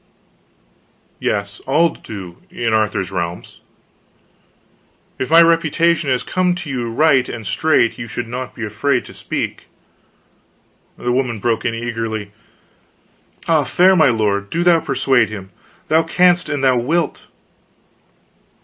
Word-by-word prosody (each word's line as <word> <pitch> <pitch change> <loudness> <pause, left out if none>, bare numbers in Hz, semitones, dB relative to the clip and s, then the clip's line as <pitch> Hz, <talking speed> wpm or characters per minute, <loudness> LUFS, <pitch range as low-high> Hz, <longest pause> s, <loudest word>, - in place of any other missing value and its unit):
"Yes. 100 0 -2
All 160 +5 +3
do, 95 - -9
in 115 -2 -2
Arthur's 105 -4 0
realms." 85 -2 -5 1.6
"If 130 - -2
my 165 +1 +7
reputation 165 -1 +2
has 125 -1 0
come 185 -1 0
to 165 -5 -6
you 120 -3 -3
right 135 +1 +3
and 115 -3 -7
straight, 125 0 +1
you 120 - -5
should 115 +2 -5
not 125 +2 -6
be 115 - -4
afraid 125 +5 -1
to - - -12
speak." - - -4 1.3
The 120 - -2
woman 125 -2 0
broke 115 +2 -1
in, 115 - 0
eagerly: 115 -3 -4 1.2
"Ah, - - +3
fair 185 +2 +4
my 160 -5 +5
lord, 100 -3 0
do 170 +1 -1
thou 175 -1 +5
persuade 130 -6 +1
him! 95 -3 -8 0.4
Thou 160 +1 +4
canst 175 0 +2
an 145 -2 -2
thou 130 -2 +3
wilt. 155 +7 -1
125 Hz, 130 wpm, -18 LUFS, 110-160 Hz, 1.6 s, my